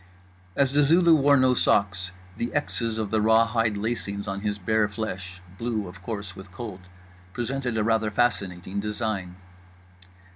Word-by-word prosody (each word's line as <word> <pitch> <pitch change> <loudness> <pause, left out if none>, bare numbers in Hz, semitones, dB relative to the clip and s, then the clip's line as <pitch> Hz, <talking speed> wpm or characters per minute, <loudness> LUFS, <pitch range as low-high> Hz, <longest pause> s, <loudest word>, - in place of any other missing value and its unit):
As 135 -1 +2
The 145 - +4
Zulu 165 +3 +5
wore 145 -2 +5
no 130 -1 +4
socks, 95 -5 +2 0.3
the 120 - -2
Xs 115 -6 -1
of 110 -3 -3
the 110 - +2
rawhide 110 0 +3
lacings 100 -2 -3
on 95 0 -3
his 105 -1 -2
bare 110 +2 +1
flesh 95 -3 -6 0.2
(blue, 115 -4 -2
of 90 +1 -11
course, 100 -2 -5
with 95 -1 -11
cold) 100 -1 -7 0.5
presented 125 -1 -2
a 110 - +2
rather 110 -1 +2
fascinating 100 -4 -1
design. 105 -3 -3
110 Hz, 150 wpm, -26 LUFS, 100-120 Hz, 0.5 s, Zulu